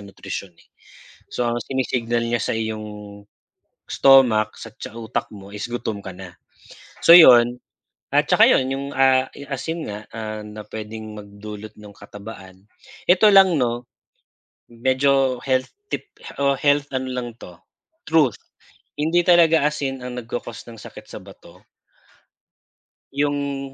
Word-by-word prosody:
nutrisyon, 100 -2 -8
eh. - - -24 0.7
So 125 - -1
ang 120 -1 -2
sinisignal 120 -2 -1
niya 120 -2 -1
sa - - -1
iyong 105 -2 -6 0.6
stomach, 120 -6 +4
sa 115 -1 -10 0.2
utak 110 -1 -4
mo 100 -1 -12
is 105 +3 -6
gutom 110 -4 -4
ka 95 - -7
na. 90 -1 -11 0.7
So 170 - +9
yun, 120 -6 +7 0.5
at - - +2
tsaka - - +5
yun 130 - +3
yung 135 +1 -3
ah, 130 -1 +3 0.2
asin 155 +4 -4
nga 105 0 -6
ah, 110 -1 -6
na 105 0 -10
pwedeng 110 0 -8
magdulot 105 +1 -10
ng 105 -1 -13
katabaan, 100 -2 -12 0.4
ito 185 +4 +5
lang 190 -3 +6
'no, 120 -3 -1 0.9
medyo 130 +2 +1
health 130 -1 0 0.2
tip - - -5 0.3
o 140 0 +3
health 145 0 +2
ano 130 0 -2
lang 125 -1 -4
to 90 - -11 0.5
truth, 155 -9 +3 0.6
hindi 165 +3 +2
talaga 165 -4 +5
asin 135 -3 -4
ang 125 0 -6
nagco-cost 120 -1 -7
ng 115 - -10
sakit - - -12
sa - - -9
bato. - - -16 1.5
Yung 140 -1 -2
120 Hz, 135 wpm, -21 LUFS, 105-135 Hz, 1.5 s, So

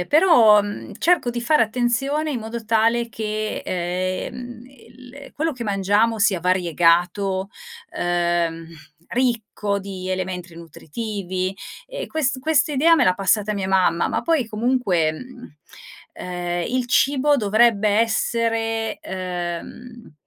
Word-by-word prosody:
Ehm, 180 - -3
però, 250 - +6
mhmm, 205 0 -7
cerco 345 -8 +2
di 240 0 -4
fare 295 +3 +3
attenzione 255 +7 0
in 265 - -2
modo 225 +1 -6
tale 230 +2 +2
che, 215 -1 -4
ehm, 185 +7 -4
il 255 +1 -15
quello 320 +2 -1
che 245 -3 -7
mangiamo 205 +3 +1
sia 205 -3 +2
variegato, 180 +2 +1 0.5
uhm, 170 -1 -1 0.4
ricco 230 -4 -1
di 190 -2 -7
elementi 185 -2 -4
nutritivi 185 +3 -5 0.3
e - - -6
quest 280 -5 -1
questa 305 0 +2
idea 315 +5 +5
me 285 -6 +3
l'ha 185 - +3
passata 200 +3 +1
mia 195 -2 -3
mamma, 185 -3 +2
ma - - -1
poi 320 -7 +1
comunque, 215 -8 0
mhmm, 250 - -11 0.6
ehm, 175 -1 -4
il 250 -1 -1
cibo 280 +3 +3
dovrebbe 215 -1 +3
essere, 225 +1 0
uhm, 185 +6 -6
220 Hz, 125 wpm, -22 LUFS, 185-245 Hz, 0.6 s, però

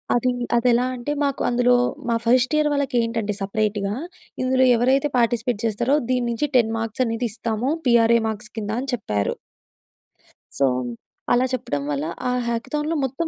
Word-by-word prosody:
అది 245 +1 +2 0.3
అదెలా 245 +1 +3
అంటే, 245 +4 -4
మాకు 280 -2 -1
అందులో 245 0 +3 0.3
మా 230 - +2
ఫస్ట్ 255 +4 +3
ఇయర్ 300 0 +2
వాళ్ళకి 280 -3 -1
ఏంటంటే 230 -2 -2
సపరేటుగా, 205 0 -1 0.5
ఇందులో 260 0 +3
ఎవరైతే 265 +5 +2
పార్టిసిపేట్ 235 -1 +1
జేస్తారో, 235 +5 +1
దీని 250 -1 +1
నుంచి 235 +5 -1
10 225 -2 +2
మార్క్స్ 225 +2 -1
అనేది 230 +1 -1
ఇస్తాము. 225 +3 -2 0.2
పీఆర్ఏ 235 -1 +5
మార్క్స్ 215 0 -6
కింద 210 -1 -3
అని 270 +1 -3
చెప్పారు... 105 - -2 1.2
సో, 140 - +3 0.7
అలా 245 +1 +4
చెప్పడం 145 - -2
వల్ల 145 +1 -2 0.2
ఆ - - +1 0.2
హ్యాకథాన్‌లో 295 +7 -2
మొత్తం 270 +6 -2
235 Hz, 150 wpm, -22 LUFS, 220-255 Hz, 1.2 s, పీఆర్ఏ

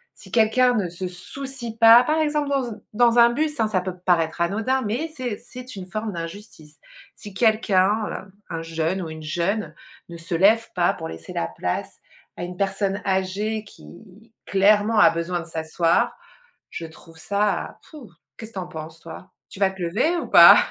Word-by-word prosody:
Si - - -14
quelqu'un 245 +2 +3
ne 195 -5 -1
se 180 +2 -5
soucie 235 +7 -6
pas, 230 +2 +8
par 310 +5 0
exemple 300 -1 0
dans 275 -2 0
un 215 -1 -9
dans 235 +1 +3
un 235 0 +7
bus, 300 +4 -2
hein, 220 - +2
ça 195 -4 0
peut 185 0 -6
paraître 165 -2 +1
anodin, 220 +9 0
mais 245 +10 -2
c'est 245 -5 -3
c'est 250 +1 -9
une 185 -2 -8
forme 215 +2 -4
d'injustice. 165 -3 -9 0.4
Si 205 - -10
quelqu'un, 215 -1 +2
heu, 190 - -8 0.2
un 165 -1 -4
jeune 165 +3 -2
ou 165 - -5
une 160 0 -9
jeune 170 +2 -2 0.4
ne 170 - -8
se 170 +1 -4
lève 215 +6 +4
pas 175 -1 +2
pour - - -7
laisser 80 0 -9
la 85 - -2
place 90 +1 -4 0.4
à - - -5
une 180 0 -7
personne 195 0 -1
âgée 195 +3 -1
qui 210 +1 -16
clairement 205 +3 +3
a - - +8
besoin 170 +2 -2
de 165 - -7
s'asseoir, 165 +1 0 0.6
je 165 - -6
trouve 160 0 -16
ça, 200 +5 -1
pfou! 290 - -13 0.3
Qu'est-ce 220 0 -9
que - - -25
tu - - -5
en 180 - -6
penses 160 -1 -9
toi? 165 +2 -11 0.2
Tu 195 - -11
vas 195 -1 +3
te 190 0 -12
lever 215 - 0
ou - - -3
pas? - - +9
195 Hz, 190 wpm, -23 LUFS, 170-225 Hz, 0.6 s, pas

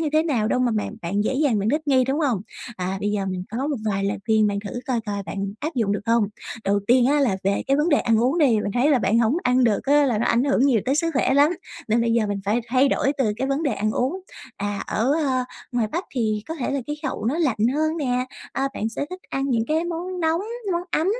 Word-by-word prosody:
như 315 - 0
thế 310 +1 +4
nào 240 -10 0
đâu 255 - +1
mà 245 -2 +2
bạn 210 - -2
bạn 200 +5 -1
dễ 260 - 0
dàng 270 -7 +2
bạn 200 +2 0
thích 300 +4 +1
nghi, 260 -2 +4
đúng 275 +5 -1
hông? 250 -10 +1 0.4
À, 185 +1 -2
bây 205 0 0
giờ 200 -2 -1
mình 185 -1 -3
có 250 +6 -2
một 290 - -1
vài 195 0 -1
lời 200 - -1
khuyên 220 -1 +4
mà 205 - 0
thử 245 +5 -5
coi 250 -3 0
coi 200 -1 -3
bạn 195 0 -4
áp 310 +1 -3
dụng 215 -5 +1
được 205 - -1
hông. 230 -1 +3 0.4
Đầu 200 +1 +2
tiên 245 0 +5
á, 290 +1 +3
là 235 -9 +2
về 200 +1 +1
cái 275 +1 +3
vấn 300 +3 +2
đề 295 - +4
ăn 230 -2 +2
uống 265 +8 +2
đi. 300 - +5
Mình 200 - -3
thấy 265 +5 +3
là 270 - +4
bạn 225 +1 +2
hổng 235 +6 +2
ăn 250 0 +3
được 215 -3 +2
á, 290 +1 +4
là 230 -5 +1
nó - - 0
ảnh 235 +2 +2
hưởng 275 -3 +2
nhiều 235 -6 +3
tới 270 - +2
sức 330 +2 +1
khỏe 265 - +2
lắm, 290 +4 +5 0.4
nên 225 +2 +3
bây 230 0 +1
giờ 230 -2 +2
mình 205 - -2
phải 215 +4 +1
thay 260 +3 +3
đổi 275 +1 +1
từ 220 -6 +2
cái 265 - -2
vấn 275 +4 0
đề 285 - +1
ăn 215 +2 -1
uống. 270 - -1 0.4
À, 205 0 -3
ở, 240 +6 +1
a, 255 -2 +1 0.3
ngoài 235 -3 +1
Bắc 350 +3 -2
thì 215 -4 0
có 325 - -3
thể 275 - -3
là 280 -1 -1
khí 295 - -2
hậu 260 - -3
nó 270 +8 0
lạnh 265 -10 +1 0.2
hơn 315 +2 0
nè, 250 -4 -1 0.3
à, 275 0 0
bạn 220 - -2
sẽ 260 +5 -4
thích 370 0 -7
ăn 270 +1 -2
những 230 -2 +1
cái 320 +2 +1
món 350 +2 -4
nóng, 325 +2 +1 0.3
món 345 - -1
ấm. 320 - +1
250 Hz, 280 wpm, -23 LUFS, 215-290 Hz, 0.4 s, tiên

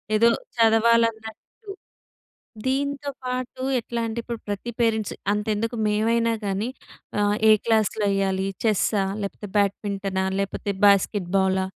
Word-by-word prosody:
ఏదో 230 +2 +5 0.3
చదవాలన్నట్టు. 230 - +1 1.0
దీంతో 280 +1 -1 0.2
పాటు 255 0 -4 0.2
ఎట్లా 235 0 -4
అంటే, 225 +1 -4
ఇప్పుడు 235 -1 -5
ప్రతి 205 +4 -4
పేరెంట్స్ 220 -3 +1 0.2
అంతెందుకు 215 +2 -1
మేమైనా 230 +2 +2
గాని 200 +4 -1 0.5
ఆహ్, 205 0 +2
ఏ - - +9
క్లాస్‌లో 220 -2 +2
యేయ్యాలి. 195 -1 0 0.2
చెస్సా 210 -1 +2 0.2
లేకపోతే 200 0 -6
బ్యాడ్మింటనా 195 -1 -1
లేకపోతే 200 +1 -2
బాస్కెట్బాలా, 190 -1 +2
215 Hz, 105 wpm, -24 LUFS, 200-230 Hz, 1.0 s, ఏ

